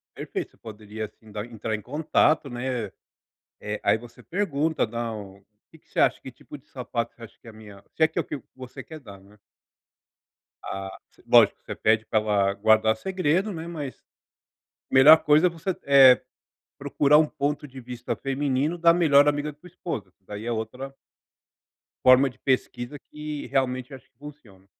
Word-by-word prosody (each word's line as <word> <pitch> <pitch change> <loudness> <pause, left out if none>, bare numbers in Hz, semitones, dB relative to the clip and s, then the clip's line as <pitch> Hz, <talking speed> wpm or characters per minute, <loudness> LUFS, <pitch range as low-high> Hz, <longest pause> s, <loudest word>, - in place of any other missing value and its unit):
Perfeito. - - -5
Você - - -25
poderia, 110 0 -8
assim, 110 +1 -20
dar 105 +1 -5
entrar 115 -2 -5
em 105 - -3
contato, 150 +2 +1
né. 120 -3 -3 0.7
Eh, 105 0 -5
aí 110 - +3
você 120 +1 -14
pergunta 160 - -1
"Não, 110 -4 -6
o 100 - -28 0.3
que 160 - -18
que - - -37
você - - -9
acha? - - +3
Que 130 - -9
tipo 145 - -12
de 135 - -23
sapato 120 -3 -4
você 115 - -18
acha 115 - -15
que - - -21
é - - -9
a - - -15
minha", 105 -2 -14
se - - -3
é - - +3
que - - -32
é - - +2
o - - -18
que 145 - -6
você 130 +1 -10
quer 160 -1 -11
dar, 100 -7 -13
né. 100 +2 -20 1.3
Ah 95 0 -5 0.4
lógico, - - +5
você - - -6
pede 110 0 +2
pra 110 - +1
ela 100 -2 +1
guardar 110 +2 +3
segredo, 185 - -1
né. 165 -1 -6
Mas 150 -6 -7 0.9
melhor 145 +5 +9
coisa 155 +3 +4
é - - +2
você, 170 +2 -4
eh, 135 -2 +7 0.6
procurar 150 +1 +3
um 155 - +4
ponto 150 0 -3
de 130 -1 -11
vista 125 0 -5
feminino 140 +4 -1
da 170 0 +5
melhor 145 -5 +5
amiga 145 +1 -1
da 145 - -26
tua 180 - -17
esposa, 115 - -6
que 95 - -45
daí 105 +2 -8
é 120 - -1
outra 125 +5 -5 1.1
forma 130 +2 +6
de - - -21
pesquisa 125 0 -2
que 150 -1 -6
realmente 130 0 -1
acho 130 - -13
que - - -51
funciona. 125 -11 -14
130 Hz, 190 wpm, -25 LUFS, 110-150 Hz, 1.3 s, melhor